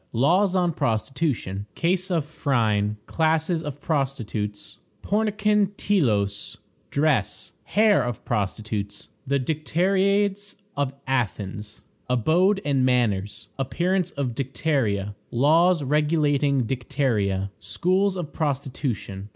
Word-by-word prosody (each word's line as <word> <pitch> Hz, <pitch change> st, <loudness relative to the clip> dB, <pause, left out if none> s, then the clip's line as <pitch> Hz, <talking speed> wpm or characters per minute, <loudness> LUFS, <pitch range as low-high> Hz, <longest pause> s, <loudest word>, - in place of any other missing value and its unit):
Laws 180 Hz, -, +3 dB
on 175 Hz, -2 st, +2 dB
Prostitution. 115 Hz, -, -1 dB
Case 185 Hz, +2 st, 0 dB
of 165 Hz, -5 st, 0 dB
Phryne. 110 Hz, -9 st, 0 dB
Classes 160 Hz, +1 st, +1 dB
of 145 Hz, -2 st, -6 dB
Prostitutes. 120 Hz, -9 st, -3 dB, 0.2 s
Pornikon 210 Hz, -1 st, +1 dB
Telos. 105 Hz, -, 0 dB, 0.3 s
Dress. 140 Hz, -9 st, 0 dB
Hair 210 Hz, -6 st, +4 dB
of 120 Hz, -2 st, -5 dB
Prostitutes. 105 Hz, -1 st, -3 dB, 0.2 s
The 140 Hz, +1 st, +2 dB
Dicteriades 195 Hz, +7 st, +1 dB, 0.2 s
of 140 Hz, -1 st, -1 dB
Athens. 105 Hz, -5 st, -3 dB, 0.3 s
Abode 175 Hz, -, +3 dB
and 140 Hz, -3 st, +2 dB
Manners. 110 Hz, -6 st, 0 dB
Appearance 175 Hz, +7 st, 0 dB
of 130 Hz, -4 st, -1 dB
Dicteria. 125 Hz, -7 st, -1 dB, 0.2 s
Laws 160 Hz, +6 st, +4 dB
regulating 145 Hz, -2 st, +2 dB
Dicteria. 115 Hz, -7 st, -1 dB
Schools 185 Hz, -, +1 dB
of 175 Hz, -5 st, -5 dB
Prostitution. 130 Hz, -, -3 dB
140 Hz, 95 wpm, -24 LUFS, 110-170 Hz, 0.3 s, Hair